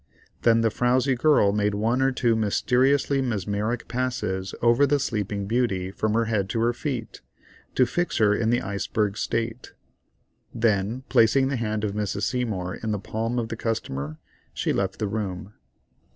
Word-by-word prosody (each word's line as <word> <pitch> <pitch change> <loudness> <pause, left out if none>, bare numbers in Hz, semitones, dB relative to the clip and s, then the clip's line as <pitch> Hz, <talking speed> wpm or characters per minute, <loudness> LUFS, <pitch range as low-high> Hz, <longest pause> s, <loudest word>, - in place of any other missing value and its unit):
Then 115 -1 +4
the 115 -1 +2
frowzy 125 +4 +2
girl 120 -6 +3
made 105 0 +1
one 115 +5 +1
or 135 0 +3
two 120 -3 +1
mysterious 125 +6 +2
mesmeric 110 -3 -1
passes 120 -7 -2
over 120 +4 +4
the 145 +1 +3
sleeping 105 -6 -2
beauty 100 -5 0
from 110 +2 -1
her 115 0 +2
head 105 -4 -1
to 115 - -1
her 120 +1 +2
feet, 125 -3 -5 0.5
to 130 - +5
fix 175 +8 -1
her 105 -2 +4
in 110 +2 0
the 120 +1 +2
iceberg 100 +1 -1
state; 115 +2 -3 0.8
then 110 +1 0
placing 130 +4 +4
the 140 - -1
hand 110 -3 -2
of 105 - 0
Mrs. 105 +3 -2
S. 105 -8 -3
in 110 - -1
the 105 - 0
palm 115 +4 -3
of 115 -2 -2
the 115 - -3
customer, 75 - -3 0.4
she - - 0
left - - -1
the 105 - -1
room. 100 -2 -4
115 Hz, 165 wpm, -25 LUFS, 105-125 Hz, 0.8 s, to